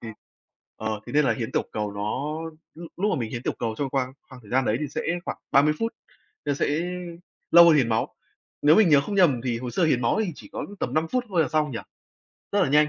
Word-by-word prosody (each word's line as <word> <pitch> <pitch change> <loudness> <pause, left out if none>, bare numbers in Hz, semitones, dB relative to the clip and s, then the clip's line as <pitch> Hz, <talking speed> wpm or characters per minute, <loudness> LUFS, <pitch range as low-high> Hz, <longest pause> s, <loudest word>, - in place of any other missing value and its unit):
ừm, 110 -1 -7 0.6
ờ, 110 -1 -3
thế - - -8
nên 150 0 +4
là - - +2
hiến 115 -4 -4
tiểu - - -1
cầu 105 -1 -3
nó 130 +10 -3 0.4
lúc 170 +1 -10
lúc 205 +4 +1
mà - - 0
mình 115 -2 -3
hiến 120 - -5
tiểu - - -1
cầu 115 -2 -2
trong 140 -2 -2
khoang 130 -1 -1 0.2
khoang 130 -1 -12
thời 105 - -16
gian 130 +1 +2
đấy 110 - +1
thì 150 - -2
sẽ - - -4 0.2
khoảng - - -4
30 145 +2 +5
phút, 225 0 -1 0.5
nó 145 - +1
sẽ 140 - 0 0.8
lâu 170 0 +9
hơn 170 - +7
hiến 125 -5 +2
máu. 110 -1 -1 0.5
Nếu 150 +2 +6
mình 215 -5 +5
nhớ 145 -2 +6
không 200 +8 -4
nhầm 155 -11 +4
thì 120 -2 -1
hồ 125 - -4
sơ 180 - 0
hiến 130 -5 +2
máu 120 - +2
thì 180 - -3
chỉ - - -13
có - - -4
tầm - - -2
5 155 +2 +1
phút 255 -1 +1
thôi 180 -4 +2
là 155 - 0
xong, 155 -2 +1
nhỉ? 115 - -4 0.7
Rất 200 -1 +3
là - - +2
nhanh. 150 +1 +5
140 Hz, 260 wpm, -25 LUFS, 120-160 Hz, 0.8 s, lâu